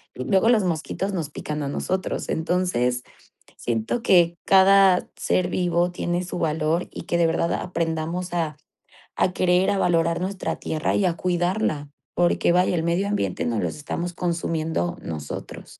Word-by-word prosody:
luego 190 - +2
los 225 -4 +4
mosquitos 180 +4 -2
nos 165 -6 -2
pican 150 0 -5
a 140 - -2
nosotros, 185 +6 -2
entonces 160 -8 0 0.5
siento 115 - -2
que 175 -5 +4
cada 195 -1 +5
ser 180 -1 0
vivo 175 0 +1
tiene 175 0 -2
su 180 0 -5
valor 160 +1 0
y - - -6
que 175 - -1
de 170 - +4
verdad 165 +1 0
aprendamos 170 +1 -2
a 160 -4 -1 0.6
a 180 - +2
querer, 180 0 +3
a 200 - +1
valorar 170 -2 +2
nuestra 190 +1 -2
tierra 155 0 -1
y 200 - +2
a 175 - +2
cuidarla. 175 -4 -1 0.3
Porque 175 0 +2
vaya, 180 0 +3
el 165 - 0
medio 170 +4 0
ambiente 205 0 -1
nos 115 -3 0
los - - -2
estamos 170 +4 -4
consumiendo 170 0 -2
nosotros. 75 -3 -7
175 Hz, 155 wpm, -24 LUFS, 160-180 Hz, 0.6 s, cada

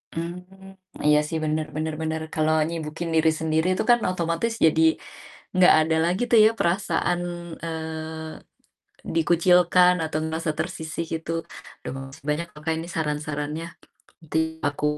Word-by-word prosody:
Mmm, 180 +3 -7 0.3
iya 150 0 +6
sih, 160 - -2
benar 155 0 0
benar 155 0 -2
benar. 160 0 -2
Kalau 155 0 +1 0.2
nyibukin 165 0 -4
diri 160 0 +4
sendiri, 160 +2 +1
itu - - 0
kan 240 - +5
otomatis 170 +6 -1
jadi 160 0 +4 0.7
nggak 185 0 +7
ada 160 +1 +2
lagi 180 +6 0
tuh 230 - +7
ya, 220 - +6
perasaan, 175 0 +1 0.5
eee, 160 -1 -5 0.8
dikucilkan 175 +2 +5
atau 155 0 -3
ngerasa 160 0 -2
tersisih, 165 -1 -3
gitu. 160 0 -3 0.5
Aduh, - - -6
makasih 135 0 -10
banyak 170 +3 -1
loh 150 - -13
Kak, 160 - +1
ini 165 +1 -5
saran-sarannya, 150 0 -2 0.6
nanti 160 0 -2 0.3
aku 145 +1 -5
160 Hz, 140 wpm, -24 LUFS, 155-175 Hz, 0.8 s, nggak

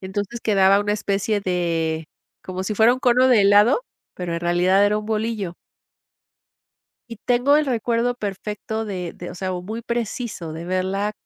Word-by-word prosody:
Entonces 205 +5 -4
quedaba 195 -2 +4
una 205 0 0
especie 205 0 -1
de 165 -4 -1 0.4
como 185 0 -5
si 210 +2 -3
fuera 225 +4 +5
un 255 - -8
cono 255 0 +4
de 225 -5 +5
helado, 205 - +5 0.3
pero 180 -2 -4
en 170 - -3
realidad 180 +3 +3
era 210 +1 +2
un 215 - -4
bolillo. 215 -5 -2 1.6
Y 230 - -7
tengo 250 +4 +4
el 305 - +1
recuerdo 240 -1 0
perfecto 210 +1 -5
de 180 -4 -5
de, 175 - -8
o - - -11
sea, 185 +1 -3
o 180 0 -4
muy 220 +4 -5
preciso 230 -7 -4
de 165 +1 -7
verla, 190 +3 -1
205 Hz, 170 wpm, -22 LUFS, 185-230 Hz, 1.6 s, fuera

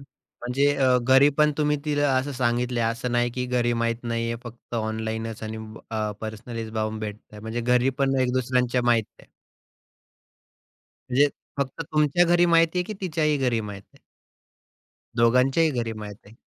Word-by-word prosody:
म्हणजे 135 0 -3
अ, 130 -2 +4
घरी, 130 +3 +5
पण 150 0 +4
तुम्ही 150 0 +2
तिला 145 -1 +1
असं 135 +2 -1
सांगितलंय, 120 -1 0
असं 115 +2 -2
नाही 120 0 +2
की 125 +1 -3
घरी 120 -1 +1
माहीत 115 0 0
नाहीये 115 0 -2
फक्त 120 0 -10
ऑनलाइनच 110 0 -3
आणि 110 0 -5 0.3
अ, 110 -1 -1
पर्सनलीच 110 +1 -6
जाऊन 110 0 -2
भेटतं 105 0 -8
म्हणजे 110 +2 -3
घरी, 125 +2 +2
पण 135 -1 +2
एक 125 -1 +1
दुसऱ्यांच्या 125 -1 +1
माहित 115 -3 +3
आहे. - - -18 1.8
म्हणजे 140 +3 +4 0.3
फक्त 135 -2 -2
तुमच्या 150 +3 +3
घरी 175 +1 +4
माहिती 165 +1 +3
आहे 180 - 0
की 215 - -6
तिच्याही 155 -5 +1
घरी 125 -4 +1
माहिती 100 -2 -8
आहे? - - -23 1.2
दोघांच्याही 130 +7 +3
घरी 120 -4 -2
माहीत 105 -1 -7
आहे. 110 - -16
120 Hz, 155 wpm, -25 LUFS, 115-140 Hz, 1.8 s, घरी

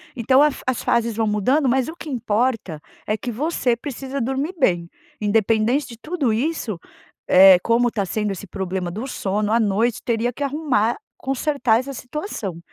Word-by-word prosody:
Então 260 +3 +4
a 300 - +4
fa - - -10
as 255 -2 -1
fases 235 -1 +1
vão 225 0 +1
mudando, 235 +8 +2
mas 255 0 +2
o 320 - -6
que 335 - -10
importa 225 - -1 0.3
é 215 - 0
que 240 - -5
você 255 -1 0
precisa 270 +2 -5
dormir 270 +8 -2
bem, 175 - +2 0.3
independente 220 +5 +2
de 230 - -11
tudo 300 -1 -1
isso, 230 - -2 0.5
eh, 190 0 +8
como 240 +1 +2
tá 205 -4 -2
sendo 210 +2 -1
esse 195 +1 -7
problema 190 -2 -3
do 215 +9 -5
sono, 210 -4 -1
à 230 - +4
noite 220 +2 +1
teria 235 +1 0
que 275 - -7
arrumar, 275 -6 0 0.2
consertar 270 -3 +1
essa 275 +2 -6
situação. 250 - -5
235 Hz, 175 wpm, -22 LUFS, 210-270 Hz, 0.5 s, eh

